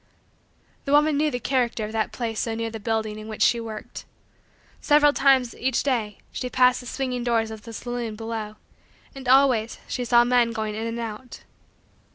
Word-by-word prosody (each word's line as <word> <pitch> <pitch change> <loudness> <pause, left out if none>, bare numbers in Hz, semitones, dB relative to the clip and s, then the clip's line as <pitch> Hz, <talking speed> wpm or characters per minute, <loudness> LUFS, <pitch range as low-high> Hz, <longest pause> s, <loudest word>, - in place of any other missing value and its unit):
The 275 - -2
woman 300 +1 +4
knew 305 +2 +2
the 245 - -3
character 240 -3 0
of 210 - -7
that 220 -1 -1
place 225 -3 -3
so 225 -1 -2
near 230 0 -3
the 225 - -6
building 220 0 -2
in 215 - -9
which 215 - -1
she 235 - +3
worked. 220 -2 -7 0.8
Several 295 -1 +5
times, 265 -4 +3
each 260 -1 -1
day, 230 -7 -1
she 250 - -4
passed 250 0 +4
the 245 - -10
swinging 255 -2 -3
doors 225 -2 0
of 220 -1 -8
the 230 - -10
saloon 240 -1 -5
below 220 -1 -5 0.6
and, 270 -3 -6
always, 255 -4 +4
she 250 - -3
saw 240 0 +5
men 240 -1 +2
going 220 -1 -3
in 220 +2 -3
and 230 0 -4
out. 230 +2 -7
235 Hz, 190 wpm, -24 LUFS, 220-255 Hz, 0.8 s, Several